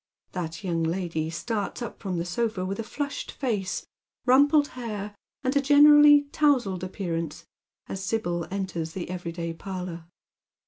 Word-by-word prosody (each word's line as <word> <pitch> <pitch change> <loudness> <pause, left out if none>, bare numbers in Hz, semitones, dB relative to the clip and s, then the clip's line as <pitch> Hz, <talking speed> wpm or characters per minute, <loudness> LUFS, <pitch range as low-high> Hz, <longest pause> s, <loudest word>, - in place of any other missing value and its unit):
That 170 0 -5
young 170 -3 -1
lady 165 -1 -1
starts 210 +6 -3
up 235 - -7
i'rom 185 -3 -2
the 170 - -2
sofa 200 +1 -1
with 195 +4 -3
flushed 285 +5 -4
face, 210 -8 -2 0.4
rumpled 285 +3 +5
hair, 210 -4 -5 0.3
and 260 +2 0
a 280 - +4
generally 295 +1 +8
towzled 255 - +2
appearance, 170 -4 -4 0.4
as 190 0 -5
Sibyl 175 -5 -1
enters 180 -5 -3
the 180 -1 -5
every 175 -2 -4
day 170 0 -4
parlour. 180 -2 -6
190 Hz, 140 wpm, -26 LUFS, 170-250 Hz, 0.4 s, generally